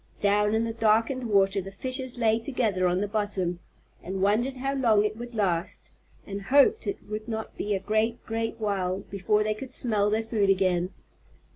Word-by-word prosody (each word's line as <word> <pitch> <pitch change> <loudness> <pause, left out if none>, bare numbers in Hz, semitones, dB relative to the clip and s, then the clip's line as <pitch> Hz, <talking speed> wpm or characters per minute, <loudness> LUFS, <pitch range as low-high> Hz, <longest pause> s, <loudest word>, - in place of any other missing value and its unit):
Down 210 +1 +2
in 225 - +2
the 230 0 -2
darkened 230 +3 +1
water 195 -1 +3
the 190 - -8
fishes 255 +5 -1
lay 225 -1 +2
together 220 -7 0
on 180 +2 +1
the 205 - 0
bottom, 200 -4 -2 0.4
and 190 +1 -5
wondered 240 +7 +1
how 270 +2 -2
long 225 -6 +3
it 210 0 -1
would 240 +1 -8
last, 180 -6 -1 0.3
and 200 0 -5
hoped 280 - +4
it 400 - -4
would 215 +1 -5
not 220 -1 -5
be 205 0 -1
a - - -1
great, 215 +4 -1
great 225 0 -2
while 195 -3 -1
before 205 +2 +1
they 215 0 0
could 250 +4 -9
smell 215 -5 0
their 220 +2 0
food 220 -3 0
again. 185 -2 +2
215 Hz, 185 wpm, -27 LUFS, 195-230 Hz, 0.4 s, hoped